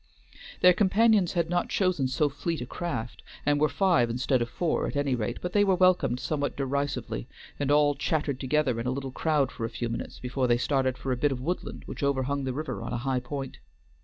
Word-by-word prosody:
Their 180 0 +8
companions 205 0 +3
had 170 -2 +1
not 175 +1 0
chosen 185 -9 +1
so 140 +4 +1
fleet 155 +3 -3
a 120 - -4
craft, 130 -5 -4 0.2
and 145 0 +2
were 155 - +4
five 175 -12 +3
instead 125 +2 +1
of 120 - -1
four 170 +5 -1
at - - -5
any 145 -2 +1
rate, 120 0 -2
but 180 - -3
they 205 - +5
were 195 -2 +3
welcomed 175 -9 +3
somewhat 145 +2 -2
derisively, 140 - -2 0.3
and 140 -1 -1
all 145 0 +4
chattered 140 -1 -1
together 130 -3 +1
in 115 - -3
a - - +1
little 135 0 -4
crowd 150 -1 +1
for 115 - -7
a 115 - -1
few 120 +1 -4
minutes 115 - -5
before 125 +1 -1
they 120 -1 +3
started 130 0 0
for 135 - -3
a 125 - 0
bit 145 +3 +2
of 130 - -2
woodland 170 +8 -4
which - - -7
overhung 140 0 0
the 130 - -1
river 155 +4 -4
on - - -5
a - - -1
high 130 -1 +1
point. 135 +1 -6
140 Hz, 220 wpm, -28 LUFS, 130-160 Hz, 0.3 s, Their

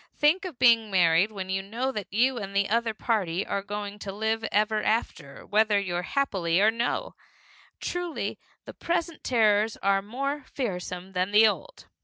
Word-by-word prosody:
Think 335 +6 +3
of 340 -8 -7
being 230 -3 +5
married 180 +1 +3
when 190 -2 -5
you 190 0 0
know 235 +7 -3
that 210 -6 -6
you 245 +4 +2
and 200 -1 -7
the 200 0 +2
other 230 -1 +1
party 195 -6 -1
are 200 - -2
going 205 0 -6
to 200 - -6
live 220 +2 -1
ever 215 0 +1
after 195 -10 -2
whether 210 0 +3 0.2
happily 185 -7 0
or 215 +2 +5
no! 235 +2 -2 0.7
Truly, 355 -2 -3 0.3
the - - -9
present 335 -2 -2
terrors 215 -3 +2
are 195 0 +2
more 275 +7 -3
fearsome 185 -6 -4
than 185 0 -1
the 210 +2 +6
old! - - -4
215 Hz, 165 wpm, -27 LUFS, 195-240 Hz, 0.7 s, the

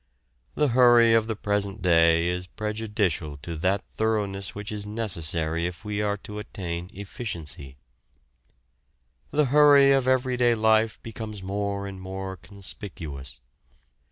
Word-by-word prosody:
The 150 - +2
hurry 120 -2 +6
of 110 -1 +3
the 110 - -2
present 100 0 -1
day 85 -1 +4
is 90 +1 -2
prejudicial 105 -8 -2
to 85 +1 -5
that 95 +5 0
thoroughness 100 -4 -2
which 105 +1 -6
is 105 -1 -4
necessary 85 -6 0
if 90 +4 -9
we 105 0 -2
are 105 -1 0
to 105 0 -6
attain 90 -4 -5
efficiency. 85 - -7 1.5
The 150 0 +2
hurry 145 -2 +7
of 135 -2 +2
everyday 125 -2 +2
life 110 0 +2
becomes 110 -3 -7
more 100 +1 -3
and 95 -1 -8
more 95 0 -6
conspicuous. 90 - -7
100 Hz, 125 wpm, -25 LUFS, 90-110 Hz, 1.5 s, hurry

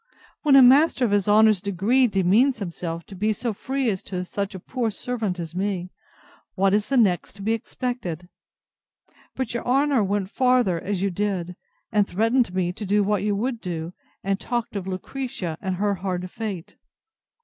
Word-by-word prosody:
When 290 -3 +5
a 270 - +9
master 270 +1 +5
of 220 - 0
his 205 -1 +2
honour's 215 -2 +5
degree 205 +7 +2
demeans 210 +7 +3
himself 170 -4 -5
to - - -12
be 215 +3 +1
so 230 +1 -3
free 265 +5 -2
as 190 - -4
that - - -14
to 180 -1 -3
such 200 +2 -4
a - - -6
poor 240 +4 -2
servant 215 -4 -3
as 165 -1 -6
me, 185 -1 -2 0.6
what 195 0 +2
is 210 0 +1
the 275 - +2
next 195 -7 +2
to 200 0 -10
be 220 +2 +1
expected?—But 225 - -7
your 235 - -3
honour 275 -1 +2
went 200 0 -1
farther, 250 -9 +2
so - - -7
you 200 -1 0
did; 180 -2 -2 0.4
and 210 -3 +3
threatened 225 +3 +1
me 180 -1 0 0.3
what 205 -1 +2
you 205 0 0
would 235 +2 -2
do, 170 -2 -5 0.3
and 195 0 0
talked 240 -1 -3
of 195 -2 -4
Lucretia, 190 -2 -4
and 190 -2 -2
her 205 +2 +1
hard 180 -1 -4
fate. 200 -7 -6
205 Hz, 175 wpm, -24 LUFS, 185-240 Hz, 0.6 s, a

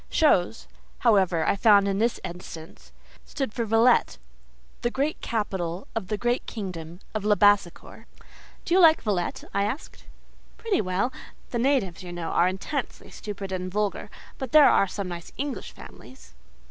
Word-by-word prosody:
"Chose," 225 - +2 0.4
however, 190 -8 +3
I - - +3
found 200 -1 +5
in 195 0 0
this 230 +2 +1
instance, 170 -2 -9 0.3
stood 270 -7 -4
for 235 - -2
Villette—the 65 - 0
great 280 +5 -2
capital 190 -5 -3
of 220 -5 -3
the 210 +1 -2
great 240 +3 0
kingdom 180 -5 -7
of 215 -2 -3
Labassecour. 205 -3 +2 0.6
"Do 345 - -1
you 375 - +5
like 320 -3 +6
Villette?" 195 -6 -2
I 200 - +1
asked. 220 +9 -5 0.5
"Pretty 440 -4 0
well. 195 +6 -1 0.4
The 235 - -1
natives, 235 -10 +1
you 180 -1 -8
know, 175 -2 -5
are 175 - +3
intensely 210 +9 -4
stupid 200 -2 -7
and 185 0 -4
vulgar; 205 0 -2 0.3
but 265 -4 -5
there 305 -2 +8
are 195 - +3
some 195 0 -5
nice 175 -1 -7
English 270 -7 -4
families." 110 - -14
200 Hz, 150 wpm, -25 LUFS, 175-235 Hz, 0.6 s, there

